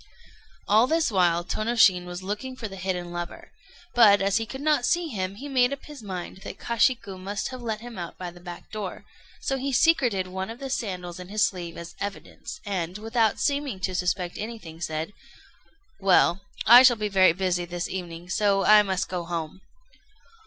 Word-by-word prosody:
] -, -, -30 dB
All 220 Hz, +4 st, +5 dB
this 320 Hz, -3 st, +1 dB
while 175 Hz, -3 st, +2 dB
Tônoshin 215 Hz, -5 st, +3 dB
was 180 Hz, +1 st, -7 dB
looking 210 Hz, +7 st, -4 dB
for 230 Hz, -3 st, -5 dB
the 195 Hz, -, -9 dB
hidden 180 Hz, -2 st, -3 dB
lover; 175 Hz, 0 st, -7 dB, 0.4 s
but, 210 Hz, -4 st, +7 dB
as 195 Hz, 0 st, +2 dB
he 225 Hz, -1 st, -2 dB
could 265 Hz, -, -7 dB
not 300 Hz, -4 st, +2 dB
see 345 Hz, +5 st, +1 dB
him, 195 Hz, -5 st, -3 dB
he 275 Hz, +8 st, -8 dB
made 255 Hz, -2 st, +3 dB
up 280 Hz, -, -6 dB
his 295 Hz, -4 st, -10 dB
mind 185 Hz, -4 st, -6 dB
that 190 Hz, -, -9 dB
Kashiku 230 Hz, -4 st, 0 dB
must 200 Hz, +4 st, -3 dB
have 255 Hz, -1 st, -8 dB
let 220 Hz, -2 st, -3 dB
him 235 Hz, -4 st, -8 dB
out 170 Hz, -1 st, -7 dB
by 180 Hz, -1 st, -6 dB
the 175 Hz, -, -15 dB
back 175 Hz, 0 st, -10 dB
door; 210 Hz, -4 st, -6 dB, 0.4 s
so 270 Hz, -, -1 dB
he 275 Hz, +2 st, -2 dB
secreted 245 Hz, -, +3 dB
one 190 Hz, +2 st, -5 dB
of 225 Hz, -, -7 dB
the 270 Hz, 0 st, -6 dB
sandals 180 Hz, -8 st, -4 dB
in 180 Hz, -, -8 dB
his 210 Hz, +1 st, +2 dB
sleeve 175 Hz, -3 st, -5 dB
as 170 Hz, 0 st, -8 dB
evidence, 200 Hz, +9 st, -7 dB
and, 185 Hz, -2 st, -3 dB
without 225 Hz, 0 st, +1 dB
seeming 280 Hz, -7 st, -1 dB
to 185 Hz, -, -1 dB
suspect 180 Hz, 0 st, -1 dB
anything, 210 Hz, -7 st, -7 dB
said: 160 Hz, +3 st, -3 dB, 0.9 s
"Well, 190 Hz, -1 st, +4 dB, 0.2 s
I 240 Hz, +3 st, +10 dB
shall 255 Hz, -2 st, +7 dB
be 210 Hz, 0 st, -1 dB
very 190 Hz, -3 st, +5 dB
busy 180 Hz, -1 st, -1 dB
this 175 Hz, 0 st, -4 dB
evening, 175 Hz, -2 st, -6 dB
so 195 Hz, +1 st, +2 dB
I 215 Hz, 0 st, +8 dB
must 190 Hz, -2 st, -1 dB
go 180 Hz, -2 st, -3 dB
home." 170 Hz, +1 st, -5 dB
195 Hz, 195 wpm, -26 LUFS, 180-235 Hz, 0.9 s, I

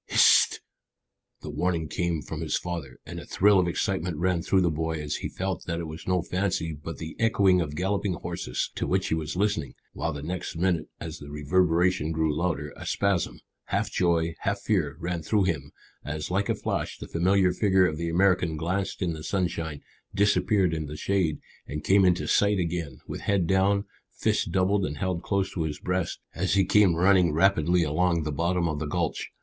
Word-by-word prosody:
"Hist!" -, -, +5 dB, 0.8 s
The -, -, -6 dB
warning 90 Hz, -2 st, 0 dB
word 75 Hz, -, -9 dB
came 85 Hz, -3 st, -1 dB
from 80 Hz, 0 st, -6 dB
his 80 Hz, -, 0 dB
father, 85 Hz, -8 st, -5 dB
and -, -, -7 dB
a -, -, -9 dB
thrill 100 Hz, 0 st, +4 dB
of 90 Hz, -, +2 dB
excitement 85 Hz, -1 st, -1 dB
ran 90 Hz, +1 st, +1 dB
through 95 Hz, +2 st, +2 dB
the 85 Hz, -2 st, +2 dB
boy 80 Hz, +1 st, -2 dB
as 75 Hz, -1 st, -3 dB
he -, -, -4 dB
felt 95 Hz, -1 st, -4 dB
that 85 Hz, -1 st, -2 dB
it -, -, -3 dB
was 80 Hz, +1 st, -9 dB
no 90 Hz, -2 st, +1 dB
fancy 90 Hz, -4 st, -1 dB
but 75 Hz, +1 st, -7 dB
the 80 Hz, 0 st, -7 dB
echoing 100 Hz, -5 st, +4 dB
of 75 Hz, -3 st, -4 dB
galloping 95 Hz, +3 st, 0 dB
horses 60 Hz, -6 st, -3 dB
to -, -, -3 dB
which 95 Hz, 0 st, 0 dB
he -, -, +1 dB
was 80 Hz, 0 st, -2 dB
listening, 100 Hz, -6 st, -1 dB, 0.2 s
while -, -, -2 dB
the 70 Hz, 0 st, -6 dB
next 90 Hz, +1 st, -4 dB
minute 85 Hz, -2 st, 0 dB
as 80 Hz, 0 st, -6 dB
the 70 Hz, -, -10 dB
reverberation 85 Hz, +2 st, +1 dB
grew 80 Hz, -2 st, 0 dB
louder, 75 Hz, -3 st, -2 dB
a -, -, -9 dB
spasm, 100 Hz, -3 st, 0 dB, 0.2 s
half -, -, -1 dB
joy, 85 Hz, -2 st, +1 dB
half 100 Hz, +1 st, -1 dB
fear, 80 Hz, -10 st, 0 dB
ran 85 Hz, 0 st, -3 dB
through 100 Hz, +6 st, +1 dB
him 80 Hz, -6 st, -2 dB, 0.3 s
as, 75 Hz, +3 st, -4 dB
like 100 Hz, +2 st, 0 dB
a -, -, +2 dB
flash, -, -, -3 dB
the -, -, -8 dB
familiar 95 Hz, +2 st, +3 dB
figure 95 Hz, -2 st, +3 dB
of 80 Hz, -4 st, -1 dB
the 85 Hz, +1 st, -2 dB
American 90 Hz, -2 st, +2 dB
glanced 95 Hz, +5 st, -2 dB
in 85 Hz, -2 st, 0 dB
the 80 Hz, -1 st, -8 dB
sunshine, 85 Hz, -5 st, -2 dB, 0.3 s
disappeared 100 Hz, -2 st, +3 dB
in 80 Hz, -2 st, -3 dB
the 75 Hz, +1 st, -7 dB
shade, 90 Hz, -6 st, 0 dB, 0.3 s
and 75 Hz, +1 st, -5 dB
came 95 Hz, 0 st, +5 dB
into 90 Hz, 0 st, +2 dB
sight 100 Hz, 0 st, +3 dB
again, 85 Hz, -6 st, -3 dB
with -, -, -6 dB
head 100 Hz, -3 st, +1 dB
down, 95 Hz, +3 st, +2 dB, 0.3 s
fists -, -, +1 dB
doubled 95 Hz, +3 st, +1 dB
and 75 Hz, -2 st, -3 dB
held 90 Hz, +2 st, -2 dB
close 100 Hz, -1 st, -1 dB
to 85 Hz, -, -2 dB
his 75 Hz, -2 st, -2 dB
breast, 90 Hz, -1 st, -2 dB, 0.2 s
as 95 Hz, +3 st, 0 dB
he 95 Hz, -1 st, +4 dB
came 100 Hz, -4 st, +4 dB
running 90 Hz, -1 st, +4 dB
rapidly 85 Hz, +1 st, +3 dB
along 85 Hz, +2 st, +1 dB
the 75 Hz, -, -2 dB
bottom 85 Hz, +3 st, 0 dB
of 75 Hz, -2 st, -2 dB
the 75 Hz, -, -3 dB
gulch. 80 Hz, +1 st, -2 dB
85 Hz, 200 wpm, -27 LUFS, 80-95 Hz, 0.8 s, Hist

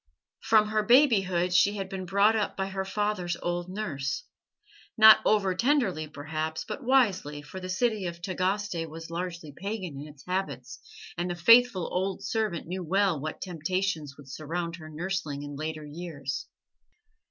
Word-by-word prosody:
From 215 Hz, -1 st, +3 dB
her 215 Hz, 0 st, +2 dB
babyhood 195 Hz, -8 st, +4 dB
she 205 Hz, +3 st, +4 dB
had 195 Hz, -2 st, -4 dB
been 190 Hz, -1 st, -6 dB
brought 200 Hz, +4 st, +4 dB
up 215 Hz, -2 st, -1 dB
by 190 Hz, 0 st, -2 dB
her 190 Hz, 0 st, -3 dB
father's 195 Hz, -4 st, -1 dB
old 175 Hz, 0 st, -3 dB
nurse 180 Hz, -, -3 dB, 0.7 s
not 220 Hz, 0 st, +9 dB
over 195 Hz, -3 st, +3 dB
tenderly 220 Hz, -, +1 dB
perhaps, 155 Hz, +2 st, -4 dB
but 275 Hz, -, -5 dB
wisely, 195 Hz, -, +2 dB
for 190 Hz, -, -8 dB
the 185 Hz, 0 st, -7 dB
city 210 Hz, 0 st, 0 dB
of 170 Hz, 0 st, -6 dB
Tagaste 185 Hz, -1 st, -2 dB
was 165 Hz, +1 st, -9 dB
largely 170 Hz, -3 st, -5 dB
pagan 185 Hz, -7 st, -5 dB
in 150 Hz, -, -8 dB
its 145 Hz, -3 st, -15 dB
habits, 140 Hz, -9 st, -3 dB, 0.4 s
and 175 Hz, +1 st, -1 dB
the 175 Hz, -, -2 dB
faithful 230 Hz, +1 st, +5 dB
old 190 Hz, +1 st, -1 dB
servant 215 Hz, -7 st, -1 dB
knew 185 Hz, +2 st, -4 dB
well 190 Hz, -1 st, +2 dB
what 155 Hz, +2 st, -5 dB
temptations 170 Hz, -3 st, -2 dB
would 145 Hz, -2 st, -14 dB
surround 165 Hz, +4 st, -4 dB
her 155 Hz, -2 st, -10 dB
nursling 155 Hz, -3 st, -3 dB
in 145 Hz, 0 st, -7 dB
later 155 Hz, +1 st, -5 dB
years. 145 Hz, -5 st, -5 dB
180 Hz, 160 wpm, -28 LUFS, 155-200 Hz, 0.7 s, not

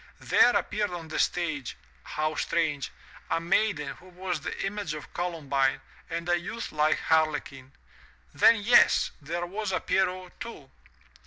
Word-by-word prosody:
There 245 Hz, -, +4 dB
appeared 210 Hz, 0 st, 0 dB
on 170 Hz, -3 st, -7 dB
the -, -, -3 dB
stage 155 Hz, -7 st, -1 dB
— -, -, -23 dB
^how 155 Hz, 0 st, 0 dB
strange! 150 Hz, -5 st, 0 dB, 0.4 s
a 165 Hz, -, +1 dB
maiden 170 Hz, -3 st, +1 dB
who 185 Hz, -, -17 dB
was 180 Hz, -3 st, -4 dB
the -, -, -4 dB
image 195 Hz, -5 st, -3 dB
of 150 Hz, -1 st, -10 dB
Colum 170 Hz, -4 st, -4 dB
bine, 135 Hz, -1 st, +2 dB, 0.3 s
and 170 Hz, 0 st, -4 dB
a 175 Hz, 0 st, +3 dB
youth 230 Hz, +7 st, -6 dB
like 155 Hz, 0 st, +2 dB
Harlequin. 145 Hz, -4 st, 0 dB, 0.6 s
Then, 230 Hz, -, +6 dB
yes! 240 Hz, +4 st, +5 dB
— -, -, -31 dB
there 170 Hz, +4 st, -3 dB
was 200 Hz, +3 st, -3 dB
a 185 Hz, -, +1 dB
Pierrot 185 Hz, -1 st, -1 dB
too. 155 Hz, -13 st, -9 dB
170 Hz, 160 wpm, -28 LUFS, 150-185 Hz, 0.6 s, Then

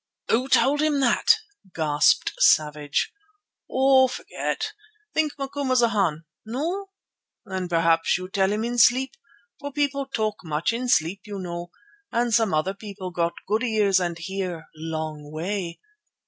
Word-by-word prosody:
"Who 250 Hz, +4 st, +2 dB
told 285 Hz, +3 st, +4 dB
him 305 Hz, -2 st, +2 dB
that?" 365 Hz, -, +4 dB, 0.4 s
gasped 150 Hz, -2 st, +3 dB
Savage. 150 Hz, -, +2 dB, 0.6 s
"Oh! 265 Hz, 0 st, +5 dB
forget. 255 Hz, -, -4 dB, 0.4 s
Think 310 Hz, -2 st, 0 dB
Macumazana. 245 Hz, -, +1 dB, 0.2 s
No? 325 Hz, -, -3 dB, 0.6 s
Then 185 Hz, -2 st, -4 dB
p'raps 165 Hz, -1 st, +3 dB
you 185 Hz, 0 st, -6 dB
tell 190 Hz, 0 st, +1 dB
him 215 Hz, +1 st, -1 dB
in 240 Hz, +1 st, -1 dB
sleep, 255 Hz, +3 st, +4 dB, 0.4 s
for 285 Hz, 0 st, -6 dB
people 280 Hz, -1 st, -1 dB
talk 215 Hz, -5 st, -1 dB
much 160 Hz, +5 st, -1 dB
in 245 Hz, +2 st, -2 dB
sleep, 185 Hz, -2 st, +2 dB
you 205 Hz, -2 st, -6 dB
know, 175 Hz, -2 st, -5 dB, 0.4 s
and 235 Hz, 0 st, +1 dB
some 225 Hz, -3 st, +3 dB
other 155 Hz, +5 st, +1 dB
people 195 Hz, -2 st, -8 dB
got 170 Hz, -1 st, 0 dB
good 215 Hz, +3 st, +1 dB
ears 210 Hz, -5 st, +3 dB
and 175 Hz, -2 st, -2 dB
hear 180 Hz, -2 st, -4 dB
long 155 Hz, -2 st, -5 dB
way. 170 Hz, +2 st, -3 dB
200 Hz, 135 wpm, -24 LUFS, 170-255 Hz, 0.6 s, Oh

